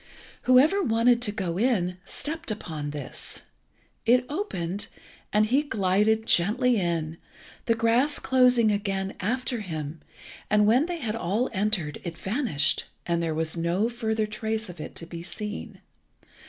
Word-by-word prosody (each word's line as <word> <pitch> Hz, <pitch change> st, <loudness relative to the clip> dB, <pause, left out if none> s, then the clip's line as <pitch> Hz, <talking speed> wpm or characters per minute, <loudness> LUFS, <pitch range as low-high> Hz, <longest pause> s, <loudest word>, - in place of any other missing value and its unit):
Whoever 295 Hz, +11 st, +6 dB
wanted 235 Hz, -4 st, +3 dB
to 220 Hz, -4 st, +2 dB
go 185 Hz, -4 st, -3 dB
in 185 Hz, -7 st, +1 dB
stepped 320 Hz, +7 st, -3 dB
upon 160 Hz, -8 st, -4 dB
this. 145 Hz, -2 st, -6 dB, 0.6 s
It 250 Hz, +2 st, +4 dB
opened, 205 Hz, -, -2 dB, 0.4 s
and 210 Hz, +1 st, +4 dB
he 260 Hz, +6 st, +3 dB
glided 220 Hz, -3 st, +1 dB
gently 230 Hz, +7 st, +3 dB
in, 165 Hz, -3 st, -1 dB, 0.5 s
the 230 Hz, -, +4 dB
grass 230 Hz, +6 st, +2 dB
closing 250 Hz, -4 st, +4 dB
again 195 Hz, -2 st, -1 dB
after 245 Hz, +4 st, -1 dB
him; 160 Hz, -5 st, -5 dB, 0.5 s
and 210 Hz, 0 st, +4 dB
when 250 Hz, +9 st, +4 dB
they 350 Hz, -1 st, -3 dB
had 230 Hz, -8 st, -3 dB
all 220 Hz, +4 st, -1 dB
entered 190 Hz, -7 st, -1 dB
it 170 Hz, -2 st, -6 dB
vanished, 190 Hz, -, +1 dB, 0.2 s
and 170 Hz, -1 st, 0 dB
there 165 Hz, -2 st, -1 dB
was 160 Hz, +1 st, 0 dB
no 175 Hz, +6 st, +1 dB
further 220 Hz, -2 st, -1 dB
trace 220 Hz, 0 st, -3 dB
of 175 Hz, -3 st, -8 dB
it 155 Hz, -, -8 dB
to 165 Hz, -, -5 dB
be 170 Hz, 0 st, -8 dB
seen. 210 Hz, +4 st, -6 dB
210 Hz, 145 wpm, -26 LUFS, 175-240 Hz, 0.6 s, Whoever